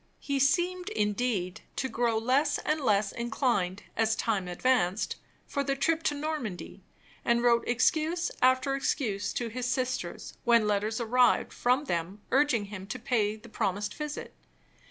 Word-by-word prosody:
He 280 -1 -1
seemed, 355 +6 +1
indeed, 210 -3 -1
to 265 - -1
grow 235 -3 0
less 255 +6 +2
and 305 0 -1
less 205 -5 +2
inclined, 235 -6 -1
as 225 0 +2
time 205 -6 -1
advanced, 195 0 +1 0.3
for 280 - -2
the 275 -1 0
trip 320 +4 +1
to 295 - +2
Normandy; 285 - -4 0.4
and 235 0 +2
wrote 235 -1 +4
excuse 315 +8 +1
after 260 +1 +3
excuse 235 -7 -1
to 235 -1 -2
his 250 +2 -3
sisters, 255 -9 -3
when 235 -2 +4
letters 210 +2 0
arrived 245 +1 +3
from 250 +4 +2
them 185 - -3
urging 265 -6 +3
him 195 -1 -8
to 195 - -4
pay 215 -3 0
the 220 +2 -14
promised 205 -2 -2
visit. 300 -1 -6
235 Hz, 150 wpm, -29 LUFS, 210-275 Hz, 0.4 s, wrote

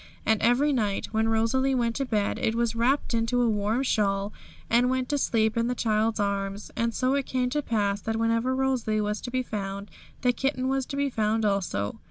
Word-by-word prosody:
And 220 -1 +2
every 255 +6 +3
night 210 -6 -1
when 220 0 +1
Rosalie 260 +4 +2
went 235 -2 0
to 275 - -1
bed 210 -5 -1
it 220 - 0
was 235 -1 0
wrapped 250 +4 +1
up 230 0 0
in 245 - +1
a 240 - +3
warm 215 +3 0
shawl, 200 -4 0 0.3
and 240 +2 +3
went 255 -1 -1
to 290 - +1
sleep 220 -4 +1
in 230 0 +1
the 250 - -1
child's 220 -1 0
arms. 200 0 -2
And 230 0 0
so 255 +3 0
it 280 -1 -1
came 250 -1 -1
to 295 +2 0
pass 205 -5 0
that 225 +2 -2
wherever 230 +3 +1
Rosalie 255 -5 0
was 210 0 -1
to - - -5
be 255 +1 -1
found, 200 -3 -5 0.3
the 250 -1 +3
kitten 260 +1 -1
was 270 -1 -1
to 275 - -5
be 280 -1 0
found 220 -1 0
also. 170 - -1
230 Hz, 220 wpm, -26 LUFS, 210-255 Hz, 0.3 s, every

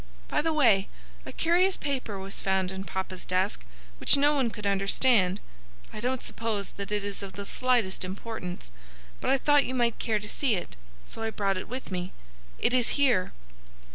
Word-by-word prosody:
By - - +2
the 325 +2 0
way, 230 -11 +4 0.4
a - - -5
curious 360 +3 +3
paper 260 -8 -3
was 195 +1 -6
found 190 -1 0
in 190 0 -5
papa's 190 -1 -4
desk 185 +2 0 0.4
which - - +5
no 290 +1 +4
one 265 -5 +2
could 210 -2 -8
understand. 200 0 +3 0.5
I 215 - -6
don't 250 +3 -1
suppose 220 -3 -2
that 200 +1 -6
it 205 -1 0
is 200 0 -3
of 195 -1 -7
the 200 +2 -6
slightest 240 -6 +1
importance, 185 - -6 0.5
but - - -1
I 270 - +5
thought 290 +1 +4
you 260 - -2
might 235 -2 +1
care 220 -2 +1
to 210 0 -6
see 250 0 +1
it, 175 - -5 0.3
so - - -7
I 225 - 0
brought 200 -3 0
it 185 - -6
with 255 -3 -6
me. 180 0 -3 0.4
It 245 - +1
is 250 +1 +2
here." 245 -10 +3
210 Hz, 190 wpm, -28 LUFS, 190-255 Hz, 0.5 s, which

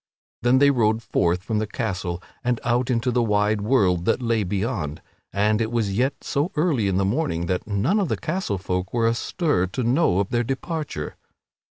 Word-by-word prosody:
Then 120 +2 +4
they 140 +1 +6
rode 115 -3 +1
forth 90 -1 +1
from 110 0 -1
the 110 - -1
castle 95 -6 -3 0.2
and 120 -1 0
out 125 +1 +1
into 125 0 +1
the 120 0 +2
wide 105 -1 +1
world 100 -7 +2
that 115 - +2
lay 115 -3 +1
beyond, 95 - -2 0.3
and 105 +2 +2
it 110 0 -1
was 110 -4 0
yet 130 +5 0
so 145 +6 -1
early 150 - +1
in 95 -1 +1
the 95 - +2
morning 100 - 0
that 90 +2 -2
none 110 - +1
of 195 - 0
the - - 0
castle 165 - -2
folk 90 +2 -3
were 115 -1 +3
astir 115 - 0
to 125 +8 -3
know 120 - +2
of 100 -1 0
their 120 0 +1
departure. 135 - -4
115 Hz, 195 wpm, -23 LUFS, 95-130 Hz, 0.3 s, they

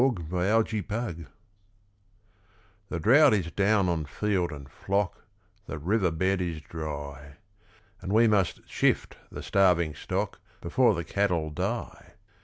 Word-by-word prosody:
With 110 -12 +1
the 105 +3 +1
Cattle 105 -7 -3 1.6
The 85 - -3
drought 130 - +6
is 85 -5 -2
down 100 0 +2
on 85 -3 -1
field 90 +2 -1
and 70 -2 -9
flock, 100 +6 -2 0.4
The - - -5
river 95 +5 +1
bed 95 +4 0
is 85 -3 -3
dry; 75 -2 -7 0.7
And 95 - -5
we 115 +2 +5
must 100 -4 +1
shift - - 0
the - - -7
starving 90 -5 +3
stock - - -3 0.2
Before 110 +6 +2
the 85 - -3
cattle 85 -3 0
die. 75 - -4
90 Hz, 130 wpm, -27 LUFS, 80-105 Hz, 1.6 s, drought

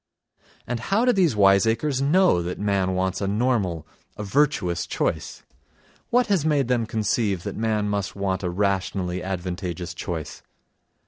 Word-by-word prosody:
And 125 -1 -3
how 200 - +1
do 250 - +4
these 175 - +2
wiseacres 110 +7 +3
know 165 - +4
that 90 +1 -4
man 100 -2 0
wants 95 +1 -1
a 100 - 0
normal, 100 - 0 0.3
a 105 - -4
virtuous 100 - +1
choice? - - -2 0.7
What 245 +1 +3
has 195 -8 +1
made 145 -5 +1
them 120 -3 +1
conceive 105 -4 0
that - - -5
man 110 -2 0
must 100 -2 -2
want 95 -2 -1
a 90 - -2
rationally 95 -1 -1
advantageous 90 -1 -4
choice? 85 -2 -5
100 Hz, 145 wpm, -24 LUFS, 95-125 Hz, 0.7 s, do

